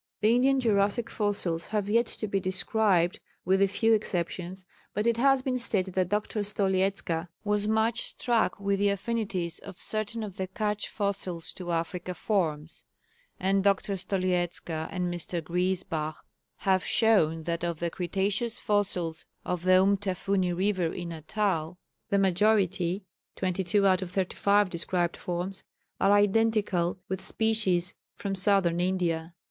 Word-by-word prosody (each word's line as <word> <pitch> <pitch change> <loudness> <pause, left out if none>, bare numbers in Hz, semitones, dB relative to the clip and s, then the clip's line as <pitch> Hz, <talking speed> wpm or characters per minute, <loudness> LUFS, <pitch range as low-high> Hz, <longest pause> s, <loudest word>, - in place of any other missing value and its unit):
The 215 +2 +4
Indian 265 +2 +3
Jurassic 215 -1 +1
fossils 195 -6 0
have 210 -2 -1
yet 230 +3 +3
to 215 - -2
be 195 -1 0
described 185 0 +1 0.3
(with 190 +2 +3
a 195 - +5
few 225 +3 +2
exceptions), 185 -2 -2 0.3
but 210 +2 0
it 235 -1 +2
has 270 +1 +4
been 255 -1 0
stated 190 -6 +3
that 185 -1 +1
Dr. 210 +1 -1
Stoliezka 190 -4 0 0.2
was 210 0 0
much 220 +2 +1
struck 235 -3 0
with 200 0 0
the 205 0 +3
affinities 200 -4 -2
of 195 -1 -11
certain 215 +1 -2
of 200 -3 -7
the 190 - -2
Cutch 210 +2 -2
fossils 195 -5 -3
to 175 -2 -6
African 175 +2 -3
forms; 160 -8 -2 0.6
and 195 +1 +2
Dr. 200 0 +2
Stoliezka 180 -3 -2
and 180 -2 -2
Mr. 175 0 -4
Griesbach 175 -2 -1 0.4
have 190 -1 +1
shown 165 -8 +2
that 170 +1 -3
of 170 -2 -1
the 170 -1 -2
Cretaceous 200 +6 -1
fossils 180 -6 -1 0.2
of 180 -2 -2
the 185 +1 +5
Umtafuni 195 -1 0
river 185 -2 0
in 175 -1 -5
Natal, 170 0 -2 0.3
the 200 - +2
majority 190 -1 +2 0.3
(22 190 +2 +1
out 185 -1 +4
of 185 - -4
35 200 +2 +2
described 175 0 -1
forms) 180 +2 -4 0.4
are 195 - +4
identical 205 -4 +2
with 190 0 -3
species 205 -5 +1 0.2
from 200 -1 -3
Southern 185 -3 +2
India. 175 -2 -1
190 Hz, 140 wpm, -28 LUFS, 175-210 Hz, 0.6 s, a